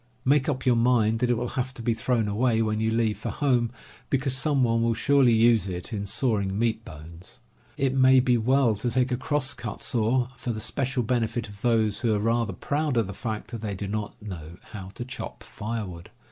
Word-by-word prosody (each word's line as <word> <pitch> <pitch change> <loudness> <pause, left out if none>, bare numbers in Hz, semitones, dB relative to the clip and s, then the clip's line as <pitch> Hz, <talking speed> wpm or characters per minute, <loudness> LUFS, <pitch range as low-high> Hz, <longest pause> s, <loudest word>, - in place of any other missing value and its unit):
Make 140 +2 +3
up 135 -2 -2
your 125 -2 +4
mind 115 -2 +3
that 125 - +1
it 120 - +3
will 120 +1 -2
have 130 0 -3
to 115 - -7
be 115 - +2
thrown 115 -1 0
away 110 +2 +1
when 110 -1 -1
you 110 0 +1
leave 110 -1 0
for - - -4
home, 125 -5 +1 0.4
because 135 -1 +1
some 140 0 +2
one 115 -1 +2
will 115 0 +1
surely 135 +1 +4
use 115 -2 +4
it 90 +3 -5
in 100 -1 -3
sawing 100 -4 0
meat 115 0 0
bones. 85 +7 -12 0.4
It 135 -1 +1
may 130 0 +6
be 125 -1 +3
well 120 0 +3
to 120 +4 -1
take 125 +2 +1
a - - +2
crosscut 130 -4 -2
saw 120 +1 +1
for 120 - -3
the 110 - -5
special 130 +2 -1
benefit 120 0 -1
of 100 0 -13
those 110 -3 +2
who 115 -3 +2
are - - 0
rather 115 -1 0
proud 145 - -1
of 115 - +3
the 100 - -6
fact 110 +3 -5
that 115 -3 -6
they 105 -3 -3
do 100 +1 -5
not 105 +1 -4
know 85 -6 -8
how 100 -4 -7
to 120 - -5
chop 130 - -7
firewood. 105 -6 -6
115 Hz, 215 wpm, -26 LUFS, 105-130 Hz, 0.4 s, may